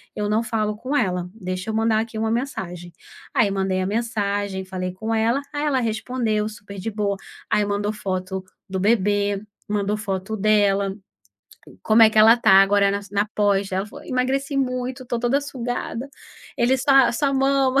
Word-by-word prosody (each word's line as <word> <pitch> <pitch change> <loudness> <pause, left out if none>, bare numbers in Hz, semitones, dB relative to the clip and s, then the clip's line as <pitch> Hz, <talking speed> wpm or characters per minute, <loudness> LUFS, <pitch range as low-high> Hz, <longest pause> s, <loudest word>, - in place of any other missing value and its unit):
eu 210 0 -2
não 215 +2 +2
falo 215 -2 -1
com 255 +6 -3
ela, 180 -7 -1
deixa 185 -2 -5
eu 220 - -2
mandar 220 0 +2
aqui 225 0 -6
uma 220 0 0
mensagem." 180 -9 -4 0.4
Aí 205 - +3
mandei 190 -1 0
a 185 - -1
mensagem, 205 -3 -2
falei 185 -1 -4
com 220 +4 -3
ela. 230 +5 +1
Aí 290 0 -2
ela 280 -3 +2
respondeu, 220 -1 -1
super 200 -2 -11
de 195 - -3
boa. 205 -1 -1 0.3
Aí 210 - +2
mandou 205 +1 -1
foto 190 -2 -3 0.3
do 190 0 -2
bebê, 205 -1 +1 0.3
mandou 205 0 -1
foto 200 0 -3
dela. 200 -1 +2 0.9
Como 220 +1 +5
é 220 - +8
que 215 - +1
ela 220 +2 +8
está 235 -4 +3
agora 200 0 +3
nas 200 0 -5
na 205 +1 +1
pós 200 -1 +2
dela, 190 0 0
ela 205 - -9
falou: - - -12
"Emagreci 270 +2 -1
muito, 255 -1 -2
estou 240 -1 -2
toda 245 +4 +2
sugada. 250 -2 -4 0.5
Ele 245 +2 +3
só 270 -2 +5
só 280 +2 0
mama, 270 0 +3
215 Hz, 180 wpm, -22 LUFS, 200-240 Hz, 0.9 s, é